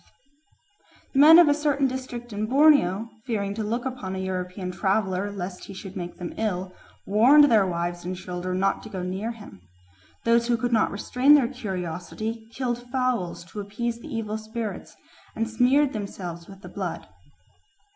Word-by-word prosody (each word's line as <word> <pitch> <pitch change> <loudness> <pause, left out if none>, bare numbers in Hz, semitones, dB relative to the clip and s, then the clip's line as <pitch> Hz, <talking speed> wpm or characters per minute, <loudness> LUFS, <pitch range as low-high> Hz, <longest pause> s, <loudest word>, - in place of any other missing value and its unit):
The 270 - +2
men 315 +3 +10
of 345 -2 +8
a 290 - +5
certain 290 -2 +1
district 250 -3 -4
in 210 +1 -2
Borneo, 255 - +4 0.2
fearing 200 -4 -1
to 220 +1 -3
look 235 +4 -2
upon 245 -8 -4
a - - -4
European 185 0 -4
traveller 190 0 0
lest 185 -2 -6
he 195 - -10
should 190 0 -9
make 175 -2 -6
them 175 -1 -6
ill, 185 -4 -2 0.3
warned 260 +8 +6
their 210 -4 +5
wives 175 0 -3
and 180 +1 -4
children 180 0 -4
not 195 +1 +1
to - - -10
go 185 -3 -5
near 190 +5 -3
him. 210 - -12 0.6
Those 235 0 +3
who 240 -1 +2
could 245 +1 -1
not 220 - +3
restrain 255 +7 +4
their 270 -5 +4
curiosity 215 0 -5
killed 240 -1 -3
fowls 235 -10 -1
to 210 - -6
appease 230 +4 -3
the 275 - -11
evil 220 -2 -3
spirits 220 -1 -6 0.4
and 225 0 -1
smeared 260 +5 +3
themselves 180 -5 -6
with 195 +1 -13
the - - -8
blood. - - -5
215 Hz, 170 wpm, -25 LUFS, 185-245 Hz, 0.6 s, men